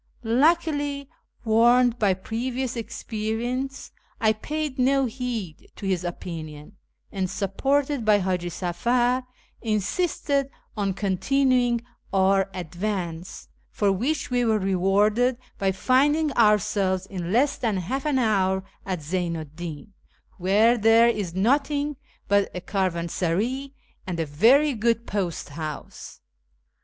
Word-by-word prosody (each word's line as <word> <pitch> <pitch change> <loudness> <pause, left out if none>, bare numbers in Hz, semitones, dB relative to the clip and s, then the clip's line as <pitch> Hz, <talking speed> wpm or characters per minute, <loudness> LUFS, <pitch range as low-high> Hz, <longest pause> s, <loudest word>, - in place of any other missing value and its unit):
Luckily, 290 +2 +1 0.3
warned 240 +2 +4
by 195 -3 +3
previous 245 +6 -3
experience, 230 +3 -4 0.3
I 220 -1 +3
paid 295 +4 -4
no 270 +1 +3
heed 235 - -5
to 205 - -8
his 185 -2 0
opinion, 165 -1 -7 0.3
and, 190 -2 -2
supported 270 +8 0
by 215 -1 +5
H;iji 180 -3 -1
Safar, 240 +9 0 0.3
insisted 275 - 0 0.3
on 200 -3 -1
continuing 245 +4 +1 0.3
our 195 0 +3
advance, 180 -1 -4 0.2
for 205 -2 +1
which 260 +9 -1
we 245 0 +2
were 220 -2 +2
rewarded 205 +6 +2 0.2
by 195 - +2
(iiidiiig 285 +9 +2
ourselves 205 -4 +2
in 180 -3 -5
less 270 +7 +2
tlian 225 -7 0
half 260 +10 -3
an 295 -3 +1
hour 190 -5 +2 0.2
at 185 -4 -3
Zeynu 170 0 -2
'd 150 +1 -22
i)iu, 170 0 -6 0.5
where 215 +6 +4
there 225 +2 +6
is 200 -7 -2
nothing 285 +7 +1 0.3
but 200 0 +3
a 180 - -4
caravansaray 190 - -1 0.4
and 175 -3 -3
a 165 - 0
very 240 - +4
good 230 0 0
post 185 -8 -3
house. 155 0 -7
215 Hz, 120 wpm, -25 LUFS, 185-255 Hz, 0.5 s, there